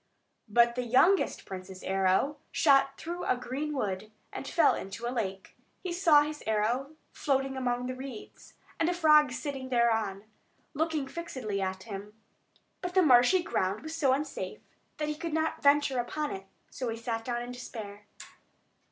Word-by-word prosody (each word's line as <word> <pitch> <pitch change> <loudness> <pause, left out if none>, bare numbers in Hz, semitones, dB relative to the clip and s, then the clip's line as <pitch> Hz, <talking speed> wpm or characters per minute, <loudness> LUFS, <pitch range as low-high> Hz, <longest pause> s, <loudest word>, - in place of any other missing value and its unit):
But 235 +2 +4
the 250 - -2
youngest 260 +11 +3
prince's 185 0 -8
arrow 190 +9 +1
shot 275 -2 +4
through 345 +2 -5
a 255 - +1
green 260 +5 -4
wood, 210 -6 -3 0.2
and - - -6
fell 335 - +4
into 210 +5 -6
a 240 - -2
lake. 195 -5 -4 0.3
He 365 -2 -3
saw 330 -5 +6
his 300 0 -5
arrow 235 +7 0 0.2
floating 270 -2 0
among 245 -1 -1
the 255 - -3
reeds, 255 -3 -10 0.2
and 330 - +2
a 355 - 0
frog 305 -4 +5
sitting 265 0 -5
thereon, 225 -5 +1 0.5
looking 310 -2 -1
fixedly 260 -12 -4
at 190 0 -3
him. 210 0 -8 0.6
But 360 0 -4
the 375 - +6
marshy 265 +6 +6
ground 195 - -1
was 315 0 -6
so 280 -5 +3
unsafe 285 +3 -3 0.4
that 300 - -2
he 300 - -1
could 325 +1 -5
not 315 0 0
venture 285 -2 +4
upon 300 +5 -2
it; 195 0 -7 0.2
so 255 -2 -3
he 225 - -3
sat 230 0 -3
down 240 0 -2
in 245 - -7
despair. 210 -4 -8
255 Hz, 165 wpm, -30 LUFS, 220-300 Hz, 0.6 s, saw